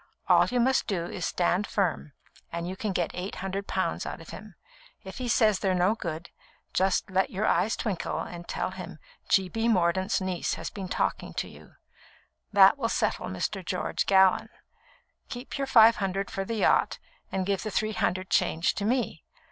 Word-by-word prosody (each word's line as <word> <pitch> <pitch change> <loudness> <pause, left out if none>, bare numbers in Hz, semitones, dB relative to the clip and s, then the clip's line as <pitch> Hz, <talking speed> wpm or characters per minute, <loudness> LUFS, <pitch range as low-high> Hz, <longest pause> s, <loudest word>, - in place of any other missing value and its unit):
All - - +5
you 250 - 0
must 260 +2 +2
do 180 -5 -1
is 180 - -7
to - - 0
stand 180 +3 +1
firm, 175 -7 -1 0.4
and 170 0 -4
you 185 - -4
can 210 +1 -3
get 175 -3 -1
eight 180 +2 -5
hundred 195 +1 -4
pounds 185 -3 -1
out - - -6
of 165 - -12
him. 210 -1 -10 0.5
If - - -9
he 250 - -3
says 215 -4 +3
they're 190 -2 +1
no 180 +4 +3
good, 170 -7 -6 0.4
just 190 +1 +1
let 190 +1 +2
your 200 +3 -2
eyes 220 - +2
twinkle 200 -6 -3
and 175 -1 -7
tell - - -2
him - - -8 0.3
G. 190 -1 +4
B. 225 +5 -1
Mordaunt's 190 -2 +2
niece 185 -2 -2
has - - -6
been 195 -2 -6
talking - - -2
to - - -2
you. - - -15 0.8
That 200 +6 +6
will 230 -3 0
settle - - -1
Mr. - - -3
George - - -2
Gallon! 190 -1 +4 0.8
Keep 250 +3 -6
your 275 - -1
five 230 -2 +7
hundred 195 0 -2
for 195 - -3
the 230 - -3
yacht, 215 - +2 0.3
and 190 -1 -1
give 195 -1 0
the 215 - -4
three 215 +1 -1
hundred 185 -1 -1
change 165 +2 +2
to 200 - -3
me. 245 +3 -1
195 Hz, 190 wpm, -27 LUFS, 185-215 Hz, 0.8 s, five